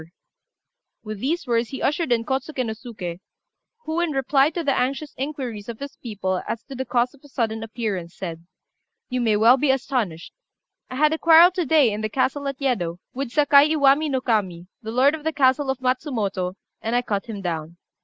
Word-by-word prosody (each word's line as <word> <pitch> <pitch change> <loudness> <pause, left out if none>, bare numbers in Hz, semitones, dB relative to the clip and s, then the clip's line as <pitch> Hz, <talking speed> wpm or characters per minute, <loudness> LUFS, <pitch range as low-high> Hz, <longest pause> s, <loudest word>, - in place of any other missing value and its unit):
] - - -60
With 215 -2 -6
these 320 - -1
words 235 -1 0
he 270 - -6
ushered 300 -1 0
in 230 -1 +2
Kôtsuké 265 0 -2
no 220 - -3
Suké, 205 -7 -7 0.7
who, 315 +2 -1
in 345 -3 0
reply 270 +1 +3
to 335 +1 -4
the 275 -3 +1
anxious 275 +3 -1
inquiries 255 -7 -5
of 230 - -6
his 280 +2 -8
people 190 -5 -3
as 230 - -4
to 275 - -10
the 260 0 -4
cause 245 0 +1
of 280 - -20
his 290 - -18
sudden 225 -2 -1
appearance, 210 -6 -4
said 170 -2 -7 0.6
"You 255 -1 -1
may 220 -3 +2
well 230 +5 +6
be 280 +1 +1
astonished. 240 -10 -1 0.6
I 255 - -6
had 305 +3 +3
a 320 - -2
quarrel 335 +2 +7
to 360 -2 -2
day 290 -7 +5
in 210 - -4
the 215 - -2
castle 270 +4 0
at 275 -1 -3
Yedo, 195 -12 -1 0.2
with 270 0 -3
Sakai 290 +2 +5
Iwami 285 +1 +4
no 260 -2 0
Kami, 190 -8 -1 0.2
the 220 - -7
lord 260 +5 +4
of 315 -2 -5
the 320 - 0
castle 270 0 +2
of 265 - 0
Matsumoto, 230 - -1 0.3
and 225 +2 -1
I 245 - +2
cut 205 -2 -2
him 205 -4 -6
down. 165 -1 -4
255 Hz, 205 wpm, -23 LUFS, 215-280 Hz, 0.7 s, quarrel